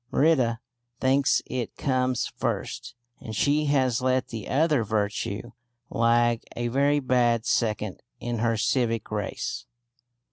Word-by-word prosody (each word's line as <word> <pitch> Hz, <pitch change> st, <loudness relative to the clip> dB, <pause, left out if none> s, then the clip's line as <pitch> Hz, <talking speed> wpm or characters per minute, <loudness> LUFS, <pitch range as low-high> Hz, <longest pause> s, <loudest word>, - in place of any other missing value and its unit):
Merida 130 Hz, -7 st, +3 dB, 0.4 s
thinks 135 Hz, +1 st, +3 dB
it 125 Hz, -3 st, -4 dB
comes 130 Hz, -2 st, 0 dB
first, -, -, -3 dB, 0.2 s
and 110 Hz, -, -7 dB
she 145 Hz, +6 st, +2 dB
has 130 Hz, -4 st, +2 dB
let 130 Hz, 0 st, +1 dB
the 115 Hz, -3 st, -6 dB
other 150 Hz, -2 st, +2 dB
virtue 105 Hz, +1 st, -2 dB, 0.4 s
lag 115 Hz, 0 st, +3 dB
a 120 Hz, 0 st, -1 dB
very 140 Hz, +4 st, +2 dB
bad 120 Hz, -3 st, +2 dB
second 105 Hz, -6 st, 0 dB, 0.2 s
in 120 Hz, -1 st, -3 dB
her 115 Hz, 0 st, +1 dB
civic 115 Hz, -1 st, 0 dB
race. 105 Hz, -1 st, -3 dB
120 Hz, 120 wpm, -26 LUFS, 115-130 Hz, 0.4 s, Merida